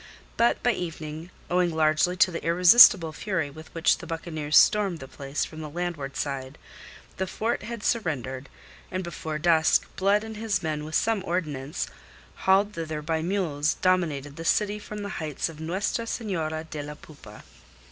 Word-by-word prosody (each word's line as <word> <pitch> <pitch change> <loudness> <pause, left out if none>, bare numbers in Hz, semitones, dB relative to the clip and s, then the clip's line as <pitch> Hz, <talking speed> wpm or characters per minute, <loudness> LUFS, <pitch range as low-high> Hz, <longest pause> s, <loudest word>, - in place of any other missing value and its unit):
But 235 +1 +2
by 245 - +4
evening, 160 -3 -6 0.2
owing 180 0 +2
largely 160 +2 +2
to 185 +1 +4
the 165 - -5
irresistible 175 -1 +7
fury 165 -6 -2
with 155 +2 -12
which 165 - +3
the - - -9
buccaneers 155 -3 -1
stormed 205 -5 +4
the 135 - -9
place 135 +2 -3
from 155 - -9
the 155 - -6
landward 160 -4 -4
side, 135 -1 -4 0.6
the 190 0 -2
fort 225 +6 -2
had 230 0 -7
surrendered, 140 - -2 0.4
and 185 0 -3
before 160 -3 -5
dusk 160 0 +3
Blood 200 +2 +2
and 220 -1 -7
his 210 -4 -1
men 150 -1 -2
with 155 - -5
some 220 -4 +1
ordnance 155 -4 -3 0.5
hauled 195 +2 +2
thither 160 -3 -4
by 160 +1 -1
mules 160 -5 0
dominated 155 -6 0
the 165 - -6
city 210 +4 +1
from 210 0 -7
the 200 - -4
heights 155 -1 -2
of 160 -2 -11
Nuestra 190 +8 -2
Senora 160 -9 -3
de 155 -2 -6
la 150 +1 -7
Poupa. 140 -9 -14
165 Hz, 165 wpm, -26 LUFS, 150-190 Hz, 0.6 s, irresistible